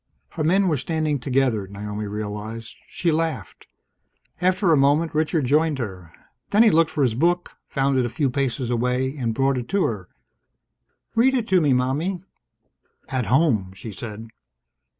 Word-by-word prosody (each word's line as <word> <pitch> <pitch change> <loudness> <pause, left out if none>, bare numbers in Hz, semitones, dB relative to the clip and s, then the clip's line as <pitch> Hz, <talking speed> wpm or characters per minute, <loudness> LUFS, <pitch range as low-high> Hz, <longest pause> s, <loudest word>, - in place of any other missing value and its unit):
Her 160 - -4
men 190 +5 +3
were 155 -4 +1
standing 155 0 -1
together, 125 -6 0
Naomi 105 +1 -5
realized. 105 +2 -6
She 170 - -1
laughed. 160 0 -3 0.7
After 185 0 +2
a - - +6
moment, 145 +4 +2
Richard 155 -1 +1
joined 150 +3 +2
her. 95 -9 -6 0.4
Then 210 +3 +5
he 225 - +5
looked 165 0 +4
for 145 - 0
his 125 -4 +2
book, 175 +8 +1 0.2
found 135 -1 +1
it - - +2
a - - -2
few 135 +2 -1
paces 130 -2 -1
away, 125 +3 0
and 120 -5 -2
brought 135 0 +1
it 120 - -8
to 195 -1 +2
her. 100 -6 -3 1.0
"Read 245 0 +2
to 185 -2 +4
me, 145 -4 +3
Mommie." 150 +9 -1 0.9
"At 130 -5 -2
home," 115 - +2
she 110 +3 -8
said. 110 +3 -8
135 Hz, 160 wpm, -23 LUFS, 115-160 Hz, 1.0 s, a